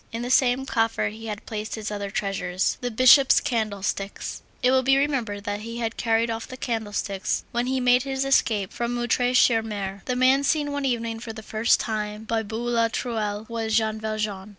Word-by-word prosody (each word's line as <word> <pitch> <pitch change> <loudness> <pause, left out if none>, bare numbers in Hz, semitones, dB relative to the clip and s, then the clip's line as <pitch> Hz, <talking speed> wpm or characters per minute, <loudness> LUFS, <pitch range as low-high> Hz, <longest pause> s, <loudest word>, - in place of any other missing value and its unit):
In 230 +1 -4
the 245 - -3
same 255 0 +3
coffer 225 -5 0
he 225 +2 -9
had 210 -1 -6
placed 215 -1 -4
his 215 -1 -5
other 200 -1 -4
treasures, 195 -3 -1
the 245 - -1
Bishop's 255 +3 +6
candlesticks. 200 -3 -3 0.2
It 250 - +5
will 260 0 +4
be 270 +1 +3
remembered 245 -8 -1
that 205 -1 -3
he 230 +2 -7
had 230 -1 -2
carried 230 0 +1
off 225 0 -4
the 255 - -9
candlesticks 210 -5 -2
when 240 +1 -1
he 260 0 0
made 250 0 +4
his 270 0 -2
escape 220 -7 +1
from 240 0 -2
Montreuil 245 +1 +1
sur 230 -2 +5
Mer. 200 -3 -5
The 250 - -1
man 260 +2 +4
seen 290 0 +1
one 285 -1 -2
evening 230 -3 -1
for 225 -1 -7
the 220 0 -9
first 220 +2 +2
time 210 -1 -3
by 225 0 -1
Boulatruelle, 225 -1 -2
was 225 -1 -2
Jean 220 -1 0
Valjean. 215 -2 -3
225 Hz, 195 wpm, -25 LUFS, 210-245 Hz, 0.2 s, Bishop's